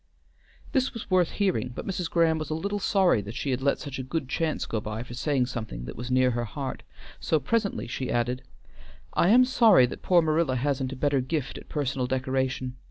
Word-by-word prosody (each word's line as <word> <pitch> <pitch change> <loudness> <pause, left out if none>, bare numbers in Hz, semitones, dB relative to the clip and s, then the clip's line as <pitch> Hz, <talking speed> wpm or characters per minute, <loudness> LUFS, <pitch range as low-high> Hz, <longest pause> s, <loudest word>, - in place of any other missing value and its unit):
This 265 -2 0
was 220 -3 -7
worth 180 -2 +4
hearing, 185 -11 0
but - - -5
Mrs. 180 -3 -2
Graham 165 -2 +3
was 155 - -5
a 155 - -1
little 200 +5 -2
sorry 190 - +3
that 105 +3 -8
she 135 +1 -2
had 130 0 -1
let 140 +1 +2
such 140 -2 -6
a - - -3
good 135 +2 -3
chance 160 +3 -1
go 110 - -3
by 105 +2 -5
for 120 - -10
saying 130 0 +1
something 110 - -6
that 65 - -7
was 120 +2 -6
near 130 0 +3
her 120 0 -2
heart, 135 +5 -5 0.4
so 160 - +1
presently 205 - -1
she 130 - -4
added, 125 +2 0 0.7
"I 175 - +3
am 250 +4 +7
sorry 225 - +6
that 125 - -7
poor 175 -2 +4
Marilla 155 -3 +1
hasn't 135 0 -1
a - - -5
better 140 0 +1
gift 135 +1 -3
at - - -16
personal 135 -3 -1
decoration. 130 0 -1
135 Hz, 215 wpm, -27 LUFS, 125-170 Hz, 0.7 s, am